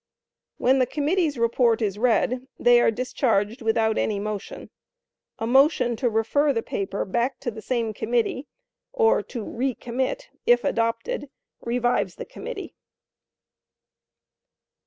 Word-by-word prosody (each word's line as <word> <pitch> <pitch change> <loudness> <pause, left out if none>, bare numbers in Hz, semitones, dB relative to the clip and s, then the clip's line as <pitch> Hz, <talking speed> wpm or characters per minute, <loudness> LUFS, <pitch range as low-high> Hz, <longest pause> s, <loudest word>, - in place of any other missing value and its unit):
When 265 +2 +3
the 255 - +3
committee's 300 +2 0
report 235 0 +2
is 205 -3 -2
read, 250 +2 +1
they 240 0 +5
are - - +4
discharged 225 -1 0
without 225 -1 +1
any 210 -2 0
motion. 210 -1 -6 0.7
A 225 - -3
motion 265 -1 +3
to 245 +1 +1
refer 230 +7 +2
the 230 -4 -1
paper 195 0 -3
back 240 +7 -1
to 240 - -2
the 220 0 -9
same 230 -2 -1
committee 240 +5 -1 0.4
(or 460 -2 +3
to 235 -4 -7
re 250 +4 -2
commit), 260 - -3 0.2
if 240 0 +5
adopted, 230 - -1 0.3
revives 245 +1 0
the - - -7
committee. - - -7
240 Hz, 130 wpm, -24 LUFS, 225-265 Hz, 0.7 s, they